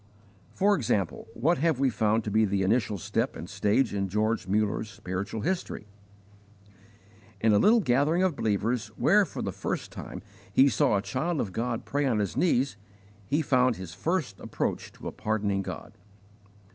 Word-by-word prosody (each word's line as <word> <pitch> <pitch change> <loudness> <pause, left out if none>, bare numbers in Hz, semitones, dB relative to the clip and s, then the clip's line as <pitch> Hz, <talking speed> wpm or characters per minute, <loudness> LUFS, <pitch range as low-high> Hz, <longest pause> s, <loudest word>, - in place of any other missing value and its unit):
For 205 +1 +4
example, 105 - -1
what 160 +7 +2
have 160 -3 +1
we 135 -2 +3
found 110 0 +1
to 105 - -4
be 110 +2 +4
the 100 -2 +1
initial 105 0 +1
step 110 +6 -1
and 85 - -7
stage 105 +5 +1
in 100 -1 -1
George 105 0 0
Muller's 105 +2 0
spiritual 100 +1 -5
history? 180 - -2 1.5
In 110 +1 +3
a 100 - +5
little 225 +2 +5
gathering 150 +5 +2
of 185 -5 +1
believers, 110 +1 0
where - - +4
for - - -6
the - - -2
first - - -4
time - - -8 0.3
he 135 +1 +5
saw 105 -3 +2
a 100 - -2
child 155 +7 -2
of 95 -7 -2
God 115 +2 -2
pray 145 0 0
on 120 -4 +1
his 100 -3 -1
knees, 135 - +1 0.5
he 150 +4 +1
found 130 -3 +3
his 95 -4 -8
first 155 - -2
approach - - -3
to - - -9
a - - -3
pardoning 105 -2 -1
God. - - -7
110 Hz, 170 wpm, -28 LUFS, 100-140 Hz, 1.5 s, a